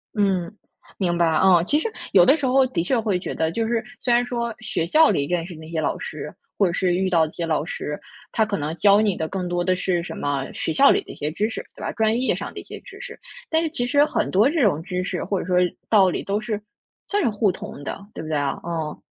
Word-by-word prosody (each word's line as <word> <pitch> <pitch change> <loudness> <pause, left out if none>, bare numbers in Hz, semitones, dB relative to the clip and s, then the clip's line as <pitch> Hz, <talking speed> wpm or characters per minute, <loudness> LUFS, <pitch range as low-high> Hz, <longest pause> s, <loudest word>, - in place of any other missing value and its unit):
嗯， 190 -5 +1 0.5
明 175 -3 0
白， 170 - +3
哦。 175 +2 +5
其 295 - +3
实 445 - -3 0.2
有 - - +7
的 280 +5 +5
时 280 - -2
候 260 +1 +4
的 170 -9 -1
确 250 +7 +1
会 205 -5 0
觉 - - -5
得， 160 0 0
就 225 +5 -1
是 230 -1 0 0.2
虽 245 - +2
然 240 +1 +3
说 235 -2 -3
学 200 -6 -2
校 315 - +5
里 140 - +1
认 170 +1 -1
识 180 - -8
的 160 - -11
那 160 0 -11
些 160 -2 -2
老 - - -1
师 - - -6 0.2
或 200 - +4
者 175 - +1
是 180 -1 +1
遇 190 0 0
到 165 -3 +4
一 155 - -8
些 170 - -4
老 155 -2 0
师， 150 -3 -5 0.3
他 220 - +2
可 205 - -2
能 150 +2 -3
教 200 +4 +5
你 205 -4 +1
的 160 - -2
更 185 0 -3
多 175 0 -1
的 185 +1 +2
是 180 -1 0
什 - - -7
么 140 -2 -1
学 - - -2
校 275 - +6
里 405 - +4
的 - - -11
一 - - -10
些 150 - -3
知 210 +7 -1
识， - - -5
对 - - -12
吧？ - - -2
专 220 +1 +1
业 260 - +2
上 - - -6
的 - - -7
一 - - -14
些 - - -9
知 - - -13
识。 - - -9 0.3
但 320 0 +2
是 325 - -1
其 245 -6 -2
实 285 +3 +4
很 305 - -1
多 210 +8 +4
这 320 -1 0
种 170 -8 +2
知 180 0 -3
识 180 -1 -3
或 195 - -1
者 - - -6
说 180 -1 +1 0.3
道 195 -4 +5
理 - - -3
都 200 +1 -1
是 215 -1 -3 0.5
算 410 0 +1
是 - - +2
互 210 -1 +1
通 145 -4 -9
的， 200 - -6
对 - - -6
不 155 - -7
对 155 - 0
啊？ 140 -1 -1
嗯。 160 -3 -3
190 Hz, 300 characters per minute, -23 LUFS, 170-230 Hz, 0.5 s, 有